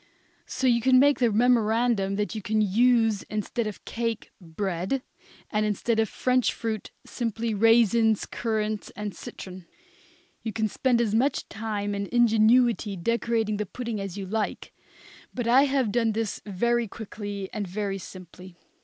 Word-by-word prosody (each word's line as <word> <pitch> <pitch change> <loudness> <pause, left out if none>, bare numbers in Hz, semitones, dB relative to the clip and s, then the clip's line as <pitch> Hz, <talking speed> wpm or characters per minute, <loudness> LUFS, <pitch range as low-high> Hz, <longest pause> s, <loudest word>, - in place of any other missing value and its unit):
So 260 - -3
you 235 -2 +4
can 255 +2 +5
make 285 +2 +5
the 240 -3 +3
memorandum 225 -3 +2
that 210 +2 -2
you 215 - -4
can 215 +2 0
use 225 +1 +3
instead 215 +2 -2
of 210 - -4
the - - -22
cake, 230 -1 -3
bread; 185 +7 -3 0.5
and 215 -1 +1
instead 215 +2 0
of 220 - +2
the - - -16
French 255 -1 +2
fruit, 220 -2 -4 0.2
simply 230 -1 -3
raisins, 225 0 +4
currants 215 -2 -2
and 210 -1 -5
citron. 185 -2 -9 0.7
You 220 - -4
can 220 -1 0
spend 240 +3 +1
as 215 -3 0
much 260 +6 +1
time 205 -1 -3
and 200 0 -3
ingenuity 230 -2 +3
decorating 225 +2 0
the 210 -1 -3
pudding 235 0 -5
as 195 -1 -6
you 195 - -4
like, 215 +2 -3 0.6
but 245 -2 -2
I 260 +4 +6
have 265 -6 +1
done 230 -1 +1
this 225 -1 -3
very 235 +4 0
quickly 205 -2 -6
and 210 -3 -3
very 195 +1 -3
simply. 185 0 -12
220 Hz, 160 wpm, -26 LUFS, 205-235 Hz, 0.7 s, I